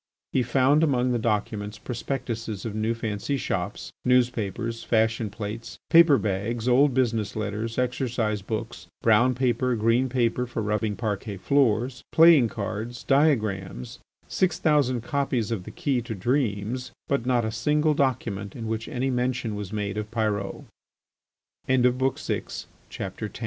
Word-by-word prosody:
He 130 - +3
found 130 +5 +3
among 130 -4 +2
the 120 - +1
documents 105 -1 -2
prospectuses 115 -4 -4
of 110 - -3
new 110 +2 0
fancy 115 +4 -2
shops, 95 -7 -3
newspapers, 115 -2 0
fashion 110 -1 +1
plates, 105 +3 -6
paper 165 -4 +7
bags, 110 +3 -2
old 130 +1 +4
business 115 -5 0
letters, 110 +2 -3
exercise 125 -4 -1
books, 110 +3 -5 0.2
brown 120 +3 +4
paper, 125 0 +1
green 115 +4 +2
paper 125 0 0
for 115 -2 -3
rubbing 105 0 -1
parquet 105 -2 -3
floors, 125 +1 +1
playing 160 -7 +7
cards, 110 +3 -5
diagrams, 115 - +1 0.3
six 185 -1 +1
thousand 140 -6 +2
copies 125 -3 -1
of 100 -6 -3
the - - -7
"Key 145 -8 -1
to 115 -1 -5
Dreams," 120 +1 -1 0.2
but 140 -3 -1
not 120 -3 +2
a 110 - -2
single 150 +7 +2
document 115 -8 -1
in 115 - -6
which 110 0 -3
any 130 +2 -1
mention 125 -2 -1
was 105 -2 -5
made 105 -1 -2
of 105 0 -5
Pyrot. 105 -3 -2 1.0
XI. 130 0 +4
CONCL 125 -5 -2
115 Hz, 140 wpm, -26 LUFS, 105-130 Hz, 1.0 s, paper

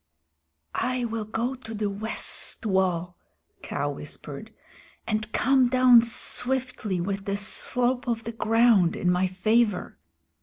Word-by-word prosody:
"I 255 -1 -1
will 225 -2 -3
go 230 +4 -2
to 235 -4 -9
the 210 0 -1
west 215 +2 0
wall," 180 -3 0 0.4
Kaa - - -3
whispered, - - -7 0.5
"and 215 0 -2
come 260 0 +3
down 255 -2 +6
swiftly 240 -3 -1
with 195 +2 -3
the 200 0 -1
slope 245 +5 -1
of 230 -1 -1
the 230 - -5
ground 225 -5 +3
in 180 - +1
my 180 +1 +1
favor. 210 +2 0
225 Hz, 125 wpm, -26 LUFS, 195-245 Hz, 0.5 s, down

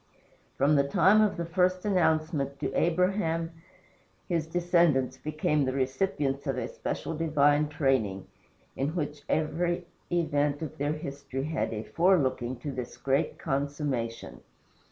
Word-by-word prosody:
From 145 +2 +4
the 140 - +4
time 190 +9 +5
of 210 -2 +2
the 170 - -2
first 180 +2 +1
announcement 155 -7 +1
to 135 -2 -2
Abraham 170 -1 +1 0.8
his 165 -3 -1
descendants 170 -6 +2
became 150 -1 0
the 130 -1 -1
recipients 135 +1 -1
of - - -1
a - - -2
special 165 - -4
divine 150 -2 +3
training, 130 -10 0 0.5
in 145 +5 -2
which 150 -3 -3
every 175 +3 0 0.3
event 145 -3 +1
of 155 - -6
their 145 +1 0
history 140 -3 -5
had 155 +2 -1
a 110 -1 -4
forelooking 135 - +2
to 145 - -4
this 125 -2 -6
great 140 +4 0
consummation. 135 -4 -3
150 Hz, 135 wpm, -28 LUFS, 135-170 Hz, 0.8 s, time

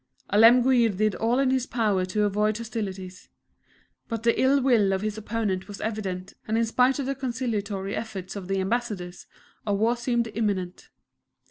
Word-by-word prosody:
Alemguir 240 +3 +6
did 210 +1 0
all 230 +2 0
in 270 -1 +2
his 260 -1 0
power 210 -6 +1
to 210 +3 0
avoid 210 +1 +1
hostilities, 195 -5 -6 0.8
but 230 -1 -4
the 235 0 +2
ill 270 +2 +4
will 235 -7 +3
of 190 +1 -2
his 215 -1 -2
opponent 210 -3 -2
was 205 -1 -8
evident, 195 -4 -4
and 220 +1 0
in 230 - +2
spite 250 +3 +2
of 280 - -2
the 275 - -1
conciliatory 220 -7 -3
efforts 195 -5 -6
of 195 -3 -6
the 195 0 0
ambassadors, 190 -4 -3 0.4
a 205 -2 0
war 225 +4 +2
seemed 240 -1 0
imminent. 195 -5 -2
215 Hz, 165 wpm, -26 LUFS, 195-240 Hz, 0.8 s, Alemguir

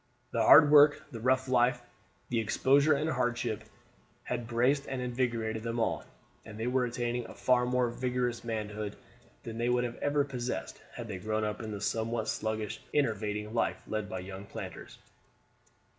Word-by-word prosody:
The - - 0
hard 145 -1 +8
work, 150 0 +7
the 115 - -6
rough 130 +3 +2
life, 125 -1 +2 0.5
the 120 - +1
exposure 140 +7 +3
and 150 +3 -1
hardship, 120 -6 -1 0.6
had 120 -2 -3
braced 125 +4 +2
and 135 -1 -3
invigorated 120 -3 -1
them 115 +1 -3
all, 115 - 0 0.4
and 110 -1 -10
they 115 - -2
were 125 0 +2
attaining 120 0 -2
a - - -11
far 125 -1 +2
more 125 0 +2
vigorous 125 -1 -2
manhood 105 -2 -4 0.5
than 115 0 -6
they 120 +1 +1
would 125 0 +2
ever 145 +4 0
have 140 - -11
possessed 125 -1 -4
had 120 -2 -6
they 100 -4 -5
grown 110 +3 -1
up 105 +1 -2
in 110 - -5
the 105 -2 -5
somewhat 115 +1 -1
sluggish 110 -1 -2
and 145 -1 +1
enervating 105 -1 -3
life 115 - 0
led 110 -1 -3
by 95 -4 -4
young 95 +1 -8
planters. - - -8
120 Hz, 175 wpm, -30 LUFS, 110-125 Hz, 0.6 s, hard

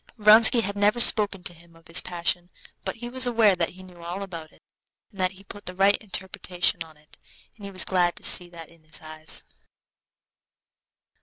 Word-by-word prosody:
Vronsky 220 +3 +6
had 200 -1 -4
never 205 +3 +1
spoken 205 -5 +5
to 175 - -3
him 170 0 -20
of 165 0 -22
his 170 - +1
passion, 175 0 -3 0.3
but - - -5
he 240 +1 -9
was 255 +1 +1
aware 225 -5 +3
that 170 -2 -2
he 185 +1 -15
knew 180 -2 -16
all 180 +4 -6
about 165 -5 -9
it, - - -26 0.5
and 200 - -18
that 185 +1 0
he 195 +1 -17
put 205 +1 -12
the 180 - -5
right 195 +2 +3
interpretation 190 -3 -2
on 160 -1 -17
it, 150 0 -21 0.4
and 205 - -13
he - - -7
was 190 -1 +2
glad 180 -2 0
to - - -16
see 180 -1 +4
that 165 -2 -11
in 170 -1 -22
his 155 -1 -9
eyes. 155 0 -7
185 Hz, 205 wpm, -24 LUFS, 170-205 Hz, 0.5 s, Vronsky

